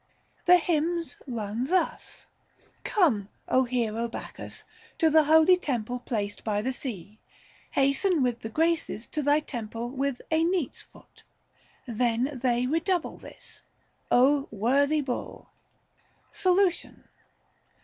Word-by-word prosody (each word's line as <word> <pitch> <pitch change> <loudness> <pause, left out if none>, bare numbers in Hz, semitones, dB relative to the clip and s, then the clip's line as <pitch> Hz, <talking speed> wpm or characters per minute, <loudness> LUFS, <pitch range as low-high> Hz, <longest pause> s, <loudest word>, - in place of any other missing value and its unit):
The 360 +1 +8
hymns 335 0 -1
run 230 -1 -3
thus: 370 +4 -1 0.3
" - - -34
Come, 240 - +2 0.2
Ο 260 0 +3
hero 235 -2 -1
Bacchus, 230 - -8 0.3
to 320 -1 +3
thy 315 +1 +7
holy 315 +4 +6
temple 245 -7 -3
placed 205 -5 -3
by 210 -2 0
the 260 +2 -1
sea; 215 -5 -6 0.5
hasten 275 +4 +2
with 245 -2 0
the 225 - -6
Graces 320 -5 0
to 305 - -2
thy 290 +1 +3
temple 235 -3 -5
with 270 -1 -2
a 320 0 +3
neat's 345 -5 -1
foot." - - -19 0.6
Then 245 +3 0
they 245 -1 +2
re 310 +6 +1
double 355 0 -1
this, - - -10 0.3
" - - -35
Ο 275 +3 +4
worthy 280 +8 +2
Bull 260 -3 -5 0.4
"! - - -38
Solution. 370 -1 +1
270 Hz, 130 wpm, -27 LUFS, 235-320 Hz, 0.6 s, The